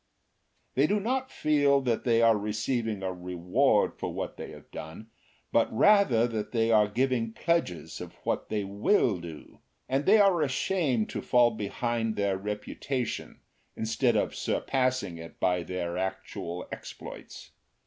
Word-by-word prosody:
They 140 +3 +3
do 205 +4 +1
not 260 +5 -1
feel 145 -2 +3
that 120 -2 -1
they 115 -1 +4
are 115 -1 +6
receiving 105 0 -2
a 95 -1 -2
reward 90 0 +1
for - - -3
what - - -4
they - - -7
have - - -13
done, 95 +9 -9 0.4
but - - +3
rather 125 - +4
that 110 -3 -4
they 115 -1 +2
are 105 -2 +5
giving 120 0 0
pledges 90 - -1
of - - -9
what - - -2
they 105 -2 -1
will 100 - +2
do, 85 -3 -10 0.3
and 135 +2 -1
they 210 +3 +7
are 195 -5 +4
ashamed 135 - 0
to - - -3
fall 120 -1 +4
behind 115 +1 -2
their 100 -1 +1
reputation 105 +5 -4 0.3
instead 115 +2 +1
of 105 - +1
surpassing 130 -10 -1
it 85 0 -11
by 90 -1 +2
their 90 0 -3
actual 95 -2 -4
exploits. - - -9
115 Hz, 150 wpm, -28 LUFS, 95-135 Hz, 0.4 s, they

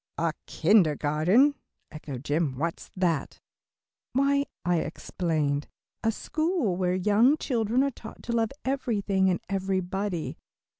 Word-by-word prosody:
"A 165 -1 0
kindergarten," 170 - +4 0.4
echoed 145 -5 -7
Jim, 150 -3 0
"what's 165 +4 -3
that?" 170 -6 -1 0.7
"Why," 280 +1 +3 0.2
I 175 0 +3
explained, 155 -2 -1 0.4
"a 225 - +3
school 310 - -1
where 180 0 +1
young 210 +10 +4
children 240 -1 +1
are 280 - +1
taught 220 -3 -11
to 240 - -4
love 225 -2 +2 0.2
everything 210 -8 +1
and 180 - +1
everybody. 190 -1 -2
190 Hz, 115 wpm, -27 LUFS, 165-235 Hz, 0.7 s, kindergarten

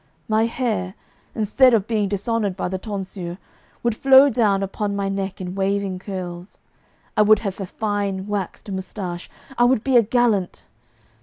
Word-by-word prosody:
My 220 +1 +2
hair, 215 -6 -2 0.4
instead 235 +3 +4
of 205 -3 +1
being 215 -3 0
dishonoured 205 -1 -1
by - - -2
the 190 0 -3
tonsure, 190 -3 -6 0.5
would 235 -2 +1
flow 270 +3 +6
down 210 -4 +2
upon 200 +1 -3
my 200 -1 -1
neck 195 -1 -3
in 180 -1 -5
waving 195 -1 -1
curls; 180 -2 -7 0.6
I - - +4
would 215 +1 +6
have 195 -3 -4
a 190 - -4
fine 200 -2 -2
waxed 205 0 -4
moustache; 185 -2 -5 0.3
I 240 - +6
would 245 -3 +2
be 265 -2 +4
a - - +8
gallant. 225 -4 0
200 Hz, 160 wpm, -22 LUFS, 190-225 Hz, 0.6 s, a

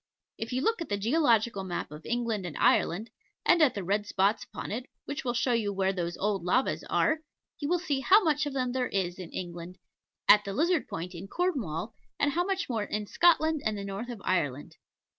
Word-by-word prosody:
If 225 - -4
you 255 +1 0
look 450 -2 +1
at 335 - -5
the 205 - 0
Geological 230 -3 +2
Map 175 -5 -4
of 150 +1 -10
England 230 -4 -1
and 160 - -7
Ireland, 215 +7 +2 0.3
and 345 - +5
the 235 -10 +3
red 205 +3 0
spots 200 +3 +1
upon - - -7
it, 245 +4 -4 0.2
which 285 - -4
will 245 -2 -1
show 245 +1 +2
you 220 -3 +1
where 190 -1 0
those 175 -2 -3
old 200 -3 -1
lavas 245 +9 +1
are, 315 0 +2 0.4
you 290 - -2
will 355 - +3
see 300 -6 -1
how 390 +10 +5
much 300 -2 +1
of 285 - -4
them 255 -2 -1
there 250 0 0
is 185 -2 -2
in 180 -3 -7
England, 175 0 -7 0.5
at 210 0 +8
the 200 - -4
Lizard 320 - +1
Point 175 +3 -5
in 175 +3 -8
Cornwall, 230 - -2 0.3
and 290 - +2
how 345 +4 +1
much 385 +1 -1
more 225 -4 -1
in 210 +1 -3
Scotland 320 +3 +3
and 215 -1 -1
the 200 - -5
north 200 +5 -5
of 235 -3 -6
Ireland. 145 -7 -1
225 Hz, 215 wpm, -29 LUFS, 190-290 Hz, 0.5 s, at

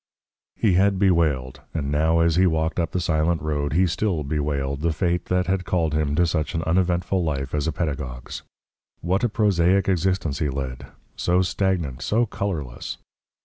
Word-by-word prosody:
He 105 -5 +2
had 95 +2 +3
bewailed, 80 -9 +1
and 70 -3 -2
now 80 +3 +2
as 85 -1 +3
he 95 +1 +4
walked 80 +1 0
up 85 -1 0
the 90 - -2
silent 80 0 +1
road 75 -2 -2
he 90 +4 +4
still 85 -1 -1
bewailed, 70 -1 -2
the 85 +1 +1
fate 85 +2 -1
that 90 0 +1
had 95 0 0
called 85 -4 0
him 75 -1 0
to 85 - +3
such 80 -2 -1
an 80 - -1
uneventful 90 +2 +1
life 70 -4 -2
as 75 +1 0
a - - +1
pedagogue's. 70 -7 -4 0.6
What 95 +6 0
a 120 - +3
prosaic 95 -3 +2
existence 90 -5 0
he 75 - 0
led, 65 -2 -5 0.3
so 90 +1 +2
stagnant, 90 -8 -1
so 115 +10 +2
colourless! 85 - -4
85 Hz, 175 wpm, -23 LUFS, 75-90 Hz, 0.6 s, he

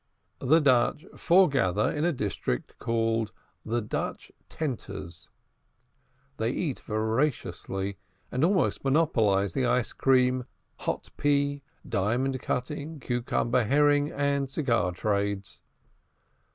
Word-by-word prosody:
The 155 +6 +4
Dutch 140 +2 +3
foregather 135 - +3
in 150 +2 -1
a 175 - +3
district 100 - -3
called 115 -2 0 0.3
"The 115 +1 -1
Dutch 105 - -4 0.2
Tenters;" 125 - -5 1.1
they 110 +1 0
eat 140 +1 -2
voraciously, 110 - -2 0.3
and 130 - 0
almost 185 +1 +2
monopolize 115 - +2
the 130 -2 +1
ice 125 -1 +1
cream, 125 -1 +3 0.3
hot - - -3
pea, 145 0 +1 0.3
diamond 125 +7 0
cutting, 150 +4 -3
cucumber, 120 -1 0
herring, 145 +3 +3
and 140 -1 0
cigar 115 - +1
trades. 100 +1 -2
125 Hz, 100 wpm, -28 LUFS, 110-145 Hz, 1.1 s, The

